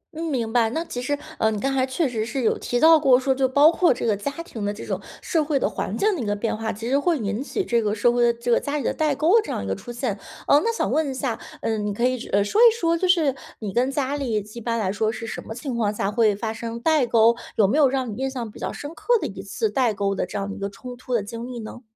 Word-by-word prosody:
嗯， 330 Hz, -, -4 dB
明 245 Hz, -7 st, -2 dB
白， 230 Hz, -2 st, +3 dB
那 325 Hz, +8 st, -3 dB
其 245 Hz, -, -5 dB
实， 290 Hz, +3 st, -1 dB, 0.2 s
呃， 220 Hz, -, +3 dB
你 215 Hz, -2 st, -2 dB
刚 270 Hz, +3 st, -1 dB
才 260 Hz, 0 st, +1 dB
确 275 Hz, +3 st, 0 dB
实 225 Hz, -3 st, -2 dB
是 240 Hz, +3 st, -3 dB
有 -, -, +2 dB
提 245 Hz, -, -1 dB
到 320 Hz, 0 st, +7 dB
过 265 Hz, -4 st, +5 dB
说 265 Hz, 0 st, +1 dB
就 265 Hz, 0 st, +1 dB
包 290 Hz, +4 st, +6 dB
括 345 Hz, -2 st, +3 dB
这 240 Hz, -, -1 dB
个 215 Hz, -3 st, +2 dB
家 205 Hz, +8 st, -3 dB
庭 220 Hz, -3 st, -7 dB
的 205 Hz, -, 0 dB
这 205 Hz, -, -8 dB
种 -, -, -3 dB, 0.2 s
社 320 Hz, -4 st, +1 dB
会 290 Hz, -2 st, 0 dB
的 -, -, +1 dB
环 -, -, -3 dB
境 420 Hz, -1 st, +2 dB
的 285 Hz, -, -4 dB
一 -, -, -3 dB
个 205 Hz, 0 st, 0 dB
变 220 Hz, +1 st, -2 dB
化， 220 Hz, 0 st, -3 dB
其 225 Hz, +3 st, -6 dB
实 275 Hz, +3 st, +2 dB
会 335 Hz, +1 st, +1 dB
引 210 Hz, +1 st, -2 dB
起 380 Hz, +6 st, -3 dB
这 235 Hz, -1 st, +2 dB
个 210 Hz, 0 st, 0 dB
社 240 Hz, +3 st, +3 dB
会 245 Hz, -, +1 dB
的 240 Hz, 0 st, +5 dB
这 235 Hz, +1 st, -3 dB
个 -, -, +5 dB
家 290 Hz, +1 st, -3 dB
里 280 Hz, -, -3 dB
的 -, -, 0 dB
代 305 Hz, -3 st, +1 dB
沟 360 Hz, +11 st, +4 dB
这 -, -, -9 dB
样 -, -, -2 dB
的 100 Hz, -, -5 dB
一 -, -, -5 dB
个 95 Hz, -, 0 dB
出 240 Hz, -, -9 dB
现， 235 Hz, -4 st, -3 dB, 0.3 s
呃， 290 Hz, -, +6 dB
那 460 Hz, -, +1 dB
想 460 Hz, -, -1 dB
问 310 Hz, -3 st, +1 dB
一 -, -, -3 dB
下， 255 Hz, -4 st, -2 dB, 0.2 s
呃， 220 Hz, -1 st, -1 dB
你 205 Hz, 0 st, -2 dB
可 235 Hz, -, +1 dB
以， 255 Hz, -2 st, -3 dB
呃， 200 Hz, 0 st, +2 dB
说 415 Hz, -, +1 dB
一 475 Hz, -, +10 dB
说 335 Hz, 0 st, +2 dB
就 370 Hz, +2 st, 0 dB
是 325 Hz, -7 st, +3 dB, 0.2 s
你 210 Hz, -4 st, -5 dB
跟 250 Hz, +3 st, +2 dB
家 280 Hz, 0 st, -1 dB
里 245 Hz, -7 st, -1 dB
几 215 Hz, +3 st, -10 dB
一 -, -, -10 dB
般 230 Hz, 0 st, -1 dB
来 195 Hz, -4 st, 0 dB
说 215 Hz, +2 st, 0 dB
是 230 Hz, 0 st, -6 dB
什 -, -, -5 dB
么 -, -, -7 dB
情 260 Hz, 0 st, -5 dB
况 215 Hz, -3 st, +1 dB
下 200 Hz, -1 st, -1 dB
会 215 Hz, -2 st, +3 dB
发 220 Hz, +1 st, -3 dB
生 230 Hz, +1 st, -6 dB
代 305 Hz, -2 st, +2 dB
沟？ 230 Hz, +1 st, +5 dB, 0.2 s
有 210 Hz, -, +4 dB
没 280 Hz, +10 st, +2 dB
有 280 Hz, -, +6 dB
让 260 Hz, -2 st, -1 dB
你 -, -, -5 dB
印 270 Hz, -, 0 dB
象 240 Hz, -4 st, -5 dB
比 -, -, -13 dB
较 -, -, -3 dB
深 295 Hz, +3 st, -7 dB
刻 485 Hz, +6 st, +2 dB
的 -, -, -3 dB
一 -, -, -6 dB
次 450 Hz, -, -2 dB
代 245 Hz, -6 st, +1 dB
沟 195 Hz, 0 st, 0 dB
的 -, -, -2 dB
这 -, -, -5 dB
样 195 Hz, -, -2 dB
的 200 Hz, -, -5 dB
一 -, -, -9 dB
个 200 Hz, -, -3 dB
冲 245 Hz, +5 st, -9 dB
突 250 Hz, 0 st, -4 dB
的 210 Hz, -, +1 dB
经 230 Hz, +3 st, -7 dB
历 250 Hz, -1 st, -7 dB
呢？ 225 Hz, +3 st, -8 dB
245 Hz, 345 characters per minute, -23 LUFS, 220-285 Hz, 0.3 s, 一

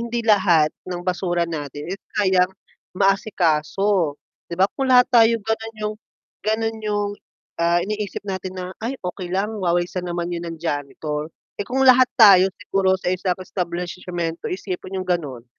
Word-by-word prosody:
hindi 235 Hz, 0 st, -2 dB
lahat 175 Hz, -8 st, +4 dB, 0.2 s
ng 180 Hz, -1 st, -4 dB
basura 175 Hz, -1 st, 0 dB
natin, 150 Hz, -2 st, -6 dB
eh, 195 Hz, -, -3 dB, 0.2 s
kayang 190 Hz, -3 st, +3 dB, 0.5 s
maasikaso. 185 Hz, -3 st, +1 dB, 0.3 s
'Di 170 Hz, -, -5 dB
ba 185 Hz, -, +5 dB
kung 270 Hz, -1 st, -2 dB
lahat 250 Hz, -1 st, +7 dB
tayo 230 Hz, -1 st, +6 dB
gano'n 225 Hz, 0 st, -3 dB
'yung 210 Hz, 0 st, -2 dB, 0.5 s
ganun 225 Hz, +1 st, -1 dB
'yung, 205 Hz, -1 st, -1 dB, 0.5 s
ah, 170 Hz, +1 st, +2 dB
iniisip 210 Hz, 0 st, -4 dB
natin 190 Hz, -1 st, -5 dB
na, 185 Hz, 0 st, -5 dB
"Ay 240 Hz, +5 st, -3 dB
okey 180 Hz, 0 st, -4 dB
lang 195 Hz, +4 st, -1 dB
wawalisan 175 Hz, 0 st, -1 dB
naman 175 Hz, 0 st, -3 dB
'yun 170 Hz, 0 st, -4 dB
ng 165 Hz, -, -6 dB
janitor," 150 Hz, -1 st, -3 dB, 0.3 s
eh, -, -, -1 dB
kung 265 Hz, +2 st, +1 dB
lahat 255 Hz, -1 st, +7 dB
tayo 195 Hz, -5 st, +8 dB
siguro 195 Hz, -2 st, +1 dB
sa 185 Hz, -1 st, -1 dB
isang 185 Hz, -1 st, -1 dB
establisyemento, 175 Hz, -2 st, -4 dB
isipin 185 Hz, 0 st, -5 dB
'yung 185 Hz, -, -7 dB
ganun, 140 Hz, -9 st, -2 dB
185 Hz, 155 wpm, -22 LUFS, 170-210 Hz, 0.5 s, tayo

